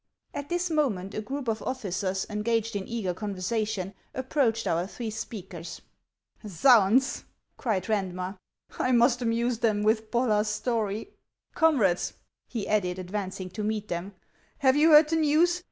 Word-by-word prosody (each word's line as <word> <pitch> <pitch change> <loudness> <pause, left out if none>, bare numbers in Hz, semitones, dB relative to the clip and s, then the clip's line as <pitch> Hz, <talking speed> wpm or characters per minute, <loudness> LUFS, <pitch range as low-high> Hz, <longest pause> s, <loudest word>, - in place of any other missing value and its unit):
At 285 0 -5
this 350 0 -1
moment 210 - 0
a 215 - -3
group 270 +4 -5
of 225 -1 -1
officers, 195 -6 -2
engaged 225 +1 -1
in 195 -1 -3
eager 220 -6 -2
conversation, 205 0 -2 0.2
approached 255 -4 0
our 170 +2 0
three 225 +2 -5
speakers. 180 -6 -7 0.3
" 215 - -16 0.2
Zounds! 250 +1 +5 0.2
" - - -50
cried 210 -8 0
Randmer, 185 -2 -2 0.2
" - - -19
I 255 - +2
must 240 +1 +4
amuse 235 0 0
them 215 -3 +1
with 220 0 +1
Bollar's 220 -3 +2
story." 220 - -2 0.2
" - - -53
Comrades," 250 - +2 0.3
he 225 -5 -4
added, 185 -4 +1
advancing 185 0 -5
to 210 +3 -4
meet 215 0 -2
them; 180 +3 -4 0.2
" - - -36
have 260 0 +5
you 305 +3 +5
heard 300 0 +8
the 325 - +2
news 320 +3 +3
220 Hz, 160 wpm, -27 LUFS, 195-255 Hz, 0.3 s, heard